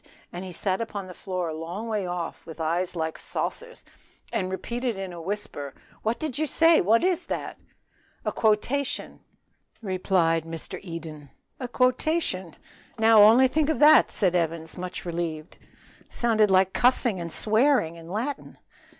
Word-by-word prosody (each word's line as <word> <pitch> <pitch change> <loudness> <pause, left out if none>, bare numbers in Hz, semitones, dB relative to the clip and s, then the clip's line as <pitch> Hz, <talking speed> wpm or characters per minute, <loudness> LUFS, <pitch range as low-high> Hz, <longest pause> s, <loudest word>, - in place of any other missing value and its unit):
and 175 +1 -5
he 185 - -7
sat 185 +3 -1
upon 205 -4 -5
the 185 - -10
floor 180 -2 -4
a - - -4
long 170 +8 -6
way 210 -4 -2
off, 175 -1 -5
with 160 0 -11
eyes 175 +3 -1
like 160 -1 -3
saucers, 485 0 -5 0.5
and 185 - -1
repeated 235 +4 -3
in 190 -2 -5
a 170 - -8
whisper, 165 -7 -5 0.3
"what 230 +5 -2 0.8
is 365 -1 +1
that?" - - -5 0.7
"A - - 0
quotation," 240 +6 0 0.6
replied 185 -5 +1
the 165 0 -6
other 165 - -7 0.2
grimly. 155 -3 -10 0.3
"A 250 - -4
quotation! 255 - 0 0.4
now 220 -1 +6
only 230 +5 +7
think 305 +3 0
of 315 - +1
that" 300 +1 +7
said 185 -4 +1
Evans, 165 -2 -1
much 180 0 -6
relieved. 165 -2 -4 0.5
"Sounded 220 -3 +2
like 190 0 +3
cussing 240 -6 +2
and 170 -1 -5
swearing 220 - +2
in 165 0 -12
Latin." 235 +9 -4
190 Hz, 145 wpm, -26 LUFS, 170-230 Hz, 0.8 s, only